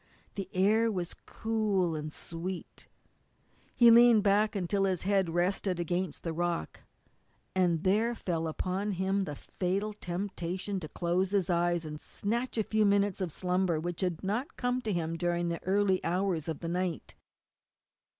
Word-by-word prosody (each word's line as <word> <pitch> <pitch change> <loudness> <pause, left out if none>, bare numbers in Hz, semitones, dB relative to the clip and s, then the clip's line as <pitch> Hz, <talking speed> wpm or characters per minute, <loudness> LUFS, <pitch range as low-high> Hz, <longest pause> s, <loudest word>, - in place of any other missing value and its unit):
The 195 -2 -5
air 215 +5 +3
was 180 -4 -3
cool 210 -6 0
and 155 0 -4
sweet. 170 +4 -7 0.9
He 235 -1 +7
leaned 235 -2 +7
back 210 +2 +3
until 195 +1 +1
his 185 -3 0
head 195 -2 +2
rested 180 +2 0
against 175 -1 -2
the 165 - -2
rock, 175 0 -2 0.7
and 175 -4 +2
there 220 +5 +2
fell 165 -6 -2
upon 190 +5 -2
him 190 +2 0
the 150 - -5
fatal 195 +7 -2
temptation 185 0 -3
to 155 -4 -7
close 180 +4 0
his 190 -3 +1
eyes 175 -1 +1
and 150 -1 -7
snatch 235 +4 -3
a 220 - +2
few 215 +1 +1
minutes 200 -1 +2
of 185 - -1
the - - -11
slumber 180 -2 +1
which 175 +1 -4
had 180 -4 -1
not 230 - -2
come 245 0 0
to 220 - -2
him 165 -2 -1
during 175 0 0
the 170 -1 -4
early 190 0 +2
hours 180 -3 0
of 160 -2 -4
the 170 - -4
night. 180 -1 -2
185 Hz, 160 wpm, -30 LUFS, 175-205 Hz, 0.9 s, He